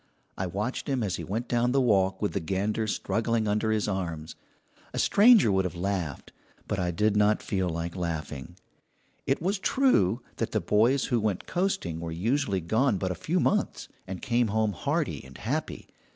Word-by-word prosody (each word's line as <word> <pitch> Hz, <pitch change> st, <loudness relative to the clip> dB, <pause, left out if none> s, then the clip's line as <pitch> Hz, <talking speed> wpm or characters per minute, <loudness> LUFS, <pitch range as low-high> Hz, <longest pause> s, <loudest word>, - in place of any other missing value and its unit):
I 95 Hz, -, -2 dB
watched 105 Hz, +8 st, -3 dB
him 130 Hz, -4 st, 0 dB
as 95 Hz, -4 st, -1 dB
he -, -, -5 dB
went 110 Hz, +5 st, -3 dB
down 120 Hz, +1 st, +1 dB
the 135 Hz, -, +4 dB
walk 95 Hz, -5 st, +2 dB
with 105 Hz, -, 0 dB
the -, -, 0 dB
gander 100 Hz, +5 st, -1 dB
struggling 115 Hz, +1 st, 0 dB
under 105 Hz, +2 st, +1 dB
his 110 Hz, -1 st, +1 dB
arms. 85 Hz, -6 st, -3 dB, 0.6 s
A -, -, -3 dB
stranger 210 Hz, -, +6 dB
would 95 Hz, 0 st, +2 dB
have 90 Hz, -2 st, -4 dB
laughed, 90 Hz, -4 st, -3 dB, 0.3 s
but 100 Hz, -, -1 dB
I 90 Hz, -1 st, 0 dB
did 105 Hz, +5 st, +1 dB
not 105 Hz, +1 st, +3 dB
feel 95 Hz, -4 st, -1 dB
like 85 Hz, +1 st, -4 dB
laughing; 80 Hz, -2 st, -4 dB, 0.7 s
it 135 Hz, -, 0 dB
was 195 Hz, +3 st, 0 dB
true 125 Hz, -, +2 dB
that 115 Hz, -, -2 dB
the 110 Hz, -, +2 dB
boys 115 Hz, +9 st, +2 dB
who 120 Hz, -, +1 dB
went 105 Hz, -4 st, -1 dB
coasting 185 Hz, -, -1 dB
were 85 Hz, 0 st, -5 dB
usually 100 Hz, -, 0 dB
gone 110 Hz, +6 st, +2 dB
but 95 Hz, 0 st, -2 dB
a -, -, 0 dB
few 85 Hz, -, -1 dB
months, -, -, 0 dB, 0.2 s
and 95 Hz, -1 st, -6 dB
came 120 Hz, 0 st, +2 dB
home 110 Hz, 0 st, +1 dB
hardy 90 Hz, -, -2 dB
and 65 Hz, 0 st, -13 dB
happy. -, -, -3 dB
105 Hz, 185 wpm, -27 LUFS, 90-120 Hz, 0.7 s, stranger